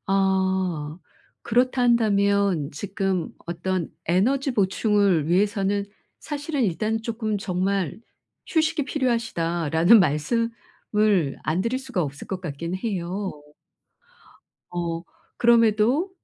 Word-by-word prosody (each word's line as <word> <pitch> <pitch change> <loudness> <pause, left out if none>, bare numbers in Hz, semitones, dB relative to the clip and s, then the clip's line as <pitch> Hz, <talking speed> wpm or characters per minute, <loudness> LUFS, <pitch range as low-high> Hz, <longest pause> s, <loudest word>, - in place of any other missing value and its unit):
아. 190 -5 0 0.4
그렇다 250 +2 +1
한다면 200 -8 +2
지금 190 +1 -2 0.2
어떤 175 0 -2
에너지 255 - +1
보충을 200 -5 +2
위해서는 200 +2 +1 0.3
사실은 290 -2 -2
일단 215 +4 -1
쪼끔 220 -2 -2
정말 190 -3 -1 0.5
"휴식이 315 -2 +1
필요하시다." 225 - -1
라는 175 +8 +6
말씀을 210 - 0
안 160 +6 0
드릴 255 +3 -1
수가 255 -9 -2
없을 145 -1 -6
것 190 -1 -4
같긴 170 +3 -4
해요. 190 -1 -3 1.4
어. 170 -1 -3 0.4
그럼에도 235 - +3
200 Hz, 220 characters per minute, -24 LUFS, 175-230 Hz, 1.4 s, 라는